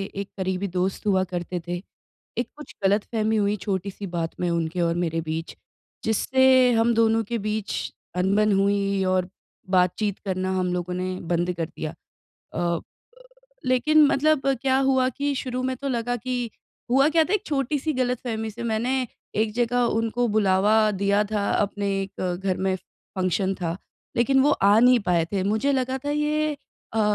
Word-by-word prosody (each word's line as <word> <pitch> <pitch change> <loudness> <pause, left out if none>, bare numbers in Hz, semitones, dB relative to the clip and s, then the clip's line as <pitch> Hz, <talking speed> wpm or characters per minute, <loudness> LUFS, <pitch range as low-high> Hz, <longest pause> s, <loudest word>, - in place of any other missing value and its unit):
एक 200 0 -4
करीबी 190 +1 -1
दोस्त 185 +3 -1
हुआ 190 -2 +3
करते 175 0 -3
थे। 175 0 -2 0.6
एक 240 - 0
कुछ 300 - -11
गलतफहमी 215 +2 +1
हुई 205 0 +2
छोटी-सी 195 0 -3
बात 165 -1 -3
में 175 - 0
उनके 170 +1 -1
और 170 0 +1
मेरे 165 -1 -1
बीच 160 +1 -4 0.5
जिससे 260 +3 +4
हम 230 +1 +3
दोनों 225 0 +3
के 235 +3 -3
बीच 215 -1 -2 0.5
अनबन 210 +3 +3
हुई 200 0 +1
और 185 -1 +1 0.5
बातचीत 185 +3 +1
करना 185 -1 -1
हम 180 -1 0
लोगों 180 0 -2
ने 185 0 -2 0.2
बंद 175 +1 0
कर 165 - -1
दिया। 155 -1 -6 0.6
अ - - -5
अ, 170 -1 0 0.9
लेकिन 295 +5 +5
मतलब 285 0 +2 0.2
क्या 265 -1 +3
हुआ 265 -1 +3
कि 285 0 0
शुरू 255 -1 -3
में 260 0 -1
तो 275 +2 -4
लगा 245 -1 -1
कि 245 -1 -3 0.4
हुआ 270 +3 +5
क्या 320 0 +4
था 355 - -3
एक 420 - 0
छोटी-सी 290 +1 -1
गलतफहमी 245 -3 -2
से 235 +3 -8
मैंने 245 +4 0 0.3
एक 215 0 +1
जगह 245 +1 +1 0.2
उनको 230 +2 0
बुलावा 210 +1 +3
दिया 200 +1 +2
था 210 0 -2
अपने 205 0 0 0.2
एक 195 - -8 0.2
घर 185 -2 +1
में 190 - +2
फंक्शन 190 +1 -3
था 170 -2 -3 0.4
लेकिन 265 +3 +3
वो 290 - +4
आ 205 -5 +4
नहीं 250 +1 +6
पाए 175 -4 +1
थे। 195 -2 0
मुझे 220 +8 +1
लगा 260 0 0
था 290 - -1
ये 300 +1 +1
अ 225 -5 -10
अ, - - +4
215 Hz, 170 wpm, -24 LUFS, 185-255 Hz, 0.9 s, नहीं